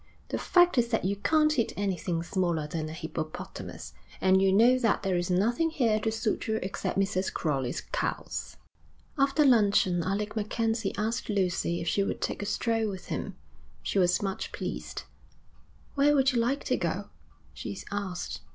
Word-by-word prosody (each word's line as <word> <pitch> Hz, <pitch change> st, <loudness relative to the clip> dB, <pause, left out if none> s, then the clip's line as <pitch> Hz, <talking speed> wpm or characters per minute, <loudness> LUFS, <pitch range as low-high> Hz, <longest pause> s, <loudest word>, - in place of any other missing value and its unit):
'The -, -, -1 dB
fact 355 Hz, -6 st, +4 dB
is 235 Hz, -, +2 dB
that 225 Hz, -5 st, 0 dB
you 200 Hz, +2 st, +1 dB
can't 305 Hz, +8 st, +3 dB
hit 235 Hz, -6 st, 0 dB
anything 180 Hz, -4 st, -1 dB
smaller 170 Hz, -4 st, 0 dB
than 155 Hz, +1 st, -4 dB
a -, -, -6 dB
hippopotamus, 160 Hz, -1 st, -6 dB, 0.3 s
and 190 Hz, 0 st, +4 dB
you 195 Hz, 0 st, +4 dB
know 235 Hz, +6 st, +5 dB
that 225 Hz, -5 st, +1 dB
there 190 Hz, -2 st, +1 dB
is 175 Hz, 0 st, -1 dB
nothing 235 Hz, -, +2 dB
here 235 Hz, -9 st, +2 dB
to 220 Hz, +1 st, -1 dB
suit 220 Hz, 0 st, -1 dB
you 220 Hz, -, +1 dB
except 190 Hz, -, -3 dB
Mrs. 195 Hz, -1 st, 0 dB
Crowley's 135 Hz, -6 st, -1 dB
cows.' -, -, -3 dB, 0.6 s
After 280 Hz, +1 st, +3 dB
luncheon 205 Hz, -7 st, +4 dB
Alec 205 Hz, +5 st, -2 dB
MacKenzie 225 Hz, +1 st, -1 dB
asked 220 Hz, +3 st, -2 dB
Lucy 180 Hz, -4 st, 0 dB
if 170 Hz, -, -5 dB
she 200 Hz, -, +2 dB
would 195 Hz, -, -1 dB
take -, -, -2 dB
a 205 Hz, -, -3 dB
stroll 225 Hz, 0 st, 0 dB
with 190 Hz, -3 st, -8 dB
him. -, -, -3 dB, 0.5 s
She 200 Hz, -, 0 dB
was 180 Hz, +2 st, +3 dB
much 195 Hz, -1 st, -3 dB
pleased. -, -, -5 dB, 0.9 s
'Where 290 Hz, +1 st, +4 dB
would 270 Hz, -1 st, +4 dB
you 240 Hz, -, +2 dB
like 255 Hz, +5 st, 0 dB
to -, -, 0 dB
go?' -, -, -3 dB, 0.4 s
she -, -, -6 dB
asked. 195 Hz, -3 st, -4 dB
205 Hz, 170 wpm, -28 LUFS, 180-235 Hz, 0.9 s, know